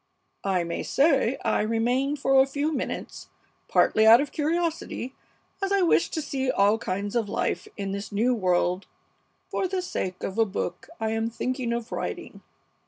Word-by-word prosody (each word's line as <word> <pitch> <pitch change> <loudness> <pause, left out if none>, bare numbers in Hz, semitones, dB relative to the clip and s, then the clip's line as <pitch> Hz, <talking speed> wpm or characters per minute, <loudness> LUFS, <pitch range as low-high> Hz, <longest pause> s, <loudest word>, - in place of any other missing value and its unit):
I 185 -2 +2
may 170 0 -3
say 275 -4 +2
I 220 - +2
remained 245 +6 +1
for 270 -1 +4
a 265 - +3
few 285 +3 -1
minutes, - - -4 0.4
partly 220 0 +4
out 230 +2 +9
of 285 0 -2
curiosity, 320 -4 -2 0.5
as 390 0 -1
I 395 -2 +3
wished 340 - +3
to 315 - -1
see 265 -2 -2
all 205 -1 +3
kinds 200 +1 -3
of 225 -4 0
life - - -1
in 200 -1 -3
this 200 +1 -5
new 230 +5 +2
world 180 -3 +1 0.6
for 380 - 0
the 375 +1 -2
sake 185 - -4
of 195 +3 -3
a 225 - +5
book 180 -3 -4
I 220 -1 -1
am 225 0 0
thinking 250 +1 -2
of 235 -1 -3
writing. - - -5
235 Hz, 170 wpm, -26 LUFS, 205-280 Hz, 0.6 s, out